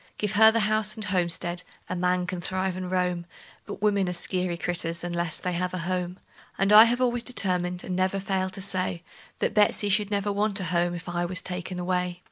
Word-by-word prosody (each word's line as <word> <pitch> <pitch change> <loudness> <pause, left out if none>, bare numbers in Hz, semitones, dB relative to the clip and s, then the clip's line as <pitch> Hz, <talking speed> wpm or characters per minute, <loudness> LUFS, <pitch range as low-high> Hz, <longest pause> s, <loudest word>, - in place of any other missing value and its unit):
Give 210 -2 -1
her 220 +3 +7
the 230 0 +1
house 215 0 +2
and 215 -2 -1
homestead 175 -1 -1 0.3
a 185 - -3
man 180 0 +1
can 180 -1 -4
thrive 185 +1 -2
and 185 -1 -5
roam; 180 -2 -1 0.4
But 205 0 -7
women 200 -3 +2
are - - -2
skeery 180 0 -1
critters, 170 -1 -2
unless 170 -1 -2
they 180 - -3
have 180 +1 -2
a 170 -2 -4
home; 180 0 -2 0.4
And 195 +2 +3
I 215 +2 +11
have 240 +2 0
always 245 -1 +2
determined, 180 -7 -1
and 185 - -4
never 185 +1 0
failed 190 -1 -2
to 195 - -4
say, 185 -3 -1 0.3
That - - -1
Betsey 210 -1 +3 0.2
never 205 0 -1
should 200 - -2
want 205 0 +1
a - - -3
home 175 0 0
if 170 - -8
I 175 0 -1
was 185 +1 -1
taken 180 0 -5
away. 180 0 -2
185 Hz, 215 wpm, -26 LUFS, 175-200 Hz, 0.4 s, I